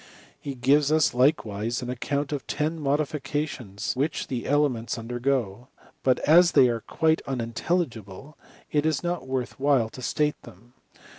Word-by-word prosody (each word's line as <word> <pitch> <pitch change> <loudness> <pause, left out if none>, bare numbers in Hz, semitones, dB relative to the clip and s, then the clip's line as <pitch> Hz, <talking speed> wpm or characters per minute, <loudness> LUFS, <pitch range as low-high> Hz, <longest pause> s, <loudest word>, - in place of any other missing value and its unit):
He 140 -2 -6
gives 140 +4 +3
ns 155 -1 +3
likewise 120 -4 +1
an 125 - -3
account 140 +4 -2
of 145 -2 -4
ten 155 +2 -2
modifications 145 -7 -2
which 145 +5 -1
the 125 - -3
three - - -7
elements 135 -6 +1
undergo; 120 -1 -2 0.3
but 130 -1 +3
as 170 +3 +5
they 125 - +6
are 115 -1 -2
quite 160 +6 +1
unintelligible, 125 - -3 0.4
it 150 -1 +2
is 155 -1 0
not 175 -5 -3
worth 130 -1 -3
while 135 -5 +2
to 130 - -11
state 150 +3 -1
them. 115 +7 -16
135 Hz, 150 wpm, -26 LUFS, 120-150 Hz, 0.4 s, they